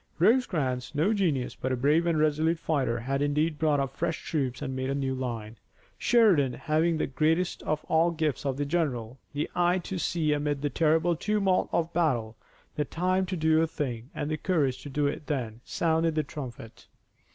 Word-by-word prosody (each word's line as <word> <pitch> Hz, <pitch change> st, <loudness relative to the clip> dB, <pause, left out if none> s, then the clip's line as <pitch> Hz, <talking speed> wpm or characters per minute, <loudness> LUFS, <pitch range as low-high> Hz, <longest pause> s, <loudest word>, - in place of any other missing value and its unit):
Rosecrans, 155 Hz, -, +1 dB
no 170 Hz, +9 st, +2 dB
genius, 160 Hz, -, 0 dB
but 130 Hz, -, -3 dB
a -, -, +2 dB
brave 150 Hz, +7 st, +3 dB
and 165 Hz, -2 st, +2 dB
resolute 155 Hz, +2 st, +2 dB
fighter, 135 Hz, -8 st, -1 dB
had 135 Hz, +3 st, -1 dB
indeed 150 Hz, +2 st, 0 dB
brought 150 Hz, -3 st, +2 dB
up 135 Hz, -1 st, -2 dB
fresh 165 Hz, +1 st, -2 dB
troops 135 Hz, -5 st, -1 dB
and 130 Hz, -, -4 dB
made 130 Hz, 0 st, -2 dB
a 135 Hz, -, 0 dB
new 135 Hz, -1 st, -1 dB
line. 115 Hz, -4 st, -5 dB, 0.4 s
Sheridan, 190 Hz, -, +4 dB
having 160 Hz, +4 st, +1 dB
that 135 Hz, -, -2 dB
greatest 165 Hz, +3 st, +1 dB
of 155 Hz, 0 st, -2 dB
all 160 Hz, +2 st, +3 dB
gifts 155 Hz, -4 st, -1 dB
of 135 Hz, -2 st, -1 dB
the 145 Hz, -, -1 dB
general, 135 Hz, -7 st, -2 dB
the 145 Hz, +1 st, -1 dB
eye 175 Hz, +1 st, +2 dB
to 185 Hz, +1 st, -4 dB
see 160 Hz, -3 st, +1 dB
amid 145 Hz, -1 st, -1 dB
the 145 Hz, -, 0 dB
terrible 160 Hz, +4 st, +2 dB
tumult 195 Hz, +1 st, +1 dB
of 170 Hz, 0 st, 0 dB
battle 120 Hz, -10 st, 0 dB, 0.4 s
the 150 Hz, -, +1 dB
time 185 Hz, +5 st, 0 dB
to 185 Hz, 0 st, -3 dB
do 160 Hz, 0 st, +3 dB
a 165 Hz, -, +2 dB
thing, 125 Hz, -6 st, -4 dB
and 145 Hz, -, -3 dB
the 155 Hz, -, 0 dB
courage 140 Hz, -6 st, 0 dB
to 145 Hz, -, -8 dB
do 145 Hz, +1 st, 0 dB
it 145 Hz, +1 st, -3 dB
then, 120 Hz, -6 st, -3 dB
sounded 165 Hz, -1 st, +1 dB
the 155 Hz, -, +1 dB
trumpet. 130 Hz, -6 st, -9 dB
150 Hz, 195 wpm, -28 LUFS, 135-165 Hz, 0.4 s, Sheridan